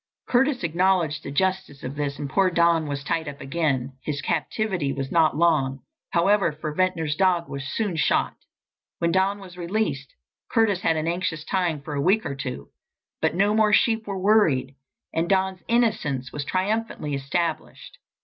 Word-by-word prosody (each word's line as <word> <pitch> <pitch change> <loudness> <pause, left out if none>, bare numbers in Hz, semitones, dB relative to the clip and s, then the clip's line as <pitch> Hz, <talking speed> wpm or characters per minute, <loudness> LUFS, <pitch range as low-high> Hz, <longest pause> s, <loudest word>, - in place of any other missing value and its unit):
Curtis 255 -1 +2
acknowledged 170 -2 +1
the - - -7
justice 185 -2 -1
of 130 - -4
this 145 -1 -2
and 145 - -4
poor 190 +7 +2
Don 170 -2 +3
was 140 -1 -4
tied 160 +2 -1
up 140 -1 -7
again. 135 -3 -1
His 145 +1 -3
captivity 170 +1 -1
was 135 -1 -4
not 160 -3 +3
long, 140 -6 +2 0.3
however, 195 +1 +3
for 150 0 -5
Ventnor's 165 -3 0
dog 180 -1 +2
was 140 -1 -6
soon 210 -6 -1
shot. - - +2 0.6
When 170 0 +1
Don 190 +3 +2
was 185 -3 -12
released, 170 - -2 0.4
Curtis 205 -5 +2
had 165 - +2
an 155 +1 -1
anxious 170 -2 -2
time 170 -6 -1
for 150 - -6
a 140 - -1
week 195 +8 +2
or 145 - -2
two. 130 - -6 0.5
But - - +1
no 200 +3 +3
more 215 -1 +3
sheep 225 0 +3
were 200 -1 -3
worried, 175 - +3 0.4
and 165 +1 0
Don's 190 -1 +1
innocence 215 - 0
was 145 -1 -4
triumphantly 190 -5 -1
established. 155 +4 -3
170 Hz, 170 wpm, -24 LUFS, 145-190 Hz, 0.6 s, Don